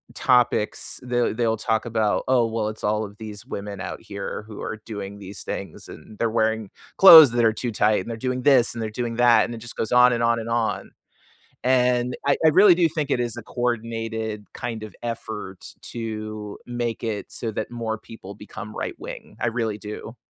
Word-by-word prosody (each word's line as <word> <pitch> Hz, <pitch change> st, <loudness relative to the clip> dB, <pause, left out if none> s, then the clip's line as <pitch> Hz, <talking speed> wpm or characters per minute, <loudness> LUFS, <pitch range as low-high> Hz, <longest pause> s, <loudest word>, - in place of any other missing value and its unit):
topics, 125 Hz, -4 st, +1 dB
they'll 120 Hz, -1 st, 0 dB
they'll 115 Hz, 0 st, 0 dB
talk 110 Hz, +1 st, 0 dB
about, 110 Hz, -3 st, 0 dB
"Oh, 125 Hz, -2 st, +4 dB
well, 110 Hz, -1 st, -2 dB
it's 110 Hz, -, -9 dB
all 105 Hz, +1 st, 0 dB
of 100 Hz, 0 st, -12 dB
these 105 Hz, -2 st, -8 dB
women 100 Hz, 0 st, -6 dB
out 90 Hz, -, -6 dB
here 100 Hz, +1 st, -6 dB
who 105 Hz, -2 st, -9 dB
are 110 Hz, -, -4 dB
doing 100 Hz, -2 st, -6 dB
these 100 Hz, 0 st, -8 dB
things, 95 Hz, -5 st, -6 dB
and 105 Hz, -, -12 dB
they're 115 Hz, -, +1 dB
wearing 110 Hz, -2 st, 0 dB, 0.3 s
clothes 160 Hz, -8 st, +11 dB
that 120 Hz, -1 st, +2 dB
are 110 Hz, -, +4 dB
too 120 Hz, +2 st, -3 dB
tight, 105 Hz, -1 st, +2 dB
and 95 Hz, -, -8 dB
they're 115 Hz, -, -4 dB
doing 125 Hz, 0 st, -2 dB
this, 130 Hz, -4 st, +4 dB
and 115 Hz, -, -5 dB
they're 110 Hz, -, -3 dB
doing 120 Hz, +1 st, -3 dB
that," 120 Hz, 0 st, +5 dB
and 120 Hz, -, -6 dB
it -, -, -8 dB
just 115 Hz, +1 st, -9 dB
goes 110 Hz, -, -2 dB
on 125 Hz, 0 st, +7 dB
and 120 Hz, -, -1 dB
on 115 Hz, 0 st, +2 dB
and 115 Hz, 0 st, -6 dB
on, 115 Hz, -1 st, -1 dB, 0.7 s
and 125 Hz, -1 st, +2 dB
I 140 Hz, -, +4 dB
I -, -, +8 dB
really 185 Hz, +3 st, +7 dB
do 170 Hz, -2 st, +3 dB
think 150 Hz, -2 st, -3 dB
it -, -, +2 dB
is 120 Hz, -2 st, -3 dB
a -, -, -7 dB
coordinated 115 Hz, -3 st, -3 dB
kind 115 Hz, -3 st, -5 dB
of 105 Hz, -3 st, -9 dB
effort 110 Hz, -5 st, -6 dB, 0.2 s
to 110 Hz, -2 st, -5 dB
make 120 Hz, -2 st, -3 dB
it 110 Hz, -3 st, -4 dB
so 115 Hz, -, -3 dB
that 110 Hz, +2 st, -4 dB
more 115 Hz, -2 st, -3 dB
people 100 Hz, -4 st, -11 dB
become 105 Hz, 0 st, -9 dB
right -, -, -4 dB
wing. -, -, -9 dB
I -, -, +1 dB
really 115 Hz, -3 st, -1 dB
do. 105 Hz, +2 st, -8 dB
115 Hz, 205 wpm, -23 LUFS, 110-120 Hz, 0.7 s, clothes